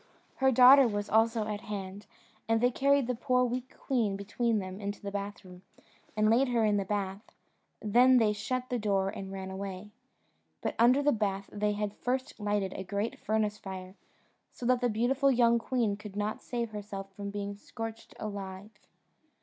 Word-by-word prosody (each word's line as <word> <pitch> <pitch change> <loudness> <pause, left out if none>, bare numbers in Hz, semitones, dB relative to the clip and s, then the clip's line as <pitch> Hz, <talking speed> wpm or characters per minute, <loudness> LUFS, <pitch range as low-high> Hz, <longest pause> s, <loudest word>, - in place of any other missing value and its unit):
Her 265 0 +4
daughter 260 +2 +8
was 205 -2 -3
also 225 0 +3
at 210 -1 -4
hand, 200 -1 -6 0.4
and 225 0 +3
they 245 +2 +3
carried 280 +1 +3
the 250 - -1
poor 250 +1 +1
weak 250 +1 -4
queen 225 -7 0
between 220 +3 0
them 190 0 -5
into 200 0 -4
the 200 - -6
bathroom, 200 -3 -6 0.6
and 215 0 +3
laid 240 +5 +4
her 235 -3 +2
in 210 -1 +2
the 200 - -1
bath: 195 0 -2 0.6
then 245 +5 +5
they 220 -3 +3
shut 255 +4 -3
the 245 - 0
door 195 -2 +1
and 195 0 -7
ran 190 -1 -6
away. 195 +1 -6 0.7
But - - -2
under 250 +5 +5
the 295 - +4
bath 200 -4 -2
they 210 0 0
had 205 0 -2
first 255 +3 -3
lighted 205 -2 -1
a 190 - -5
great 200 +4 -3
furnace 215 -1 -1
fire, 185 -1 -7 0.6
so 245 - -8
that 250 0 +3
the 245 - +2
beautiful 250 +5 +2
young 235 -2 +4
queen 230 -4 0
could 205 -1 -10
not 210 +1 -2
save 235 -2 -3
herself 200 -2 -7
from 200 0 -6
being 200 0 -4
scorched 225 +2 -8
alive. 200 -1 -6
210 Hz, 180 wpm, -30 LUFS, 200-240 Hz, 0.7 s, daughter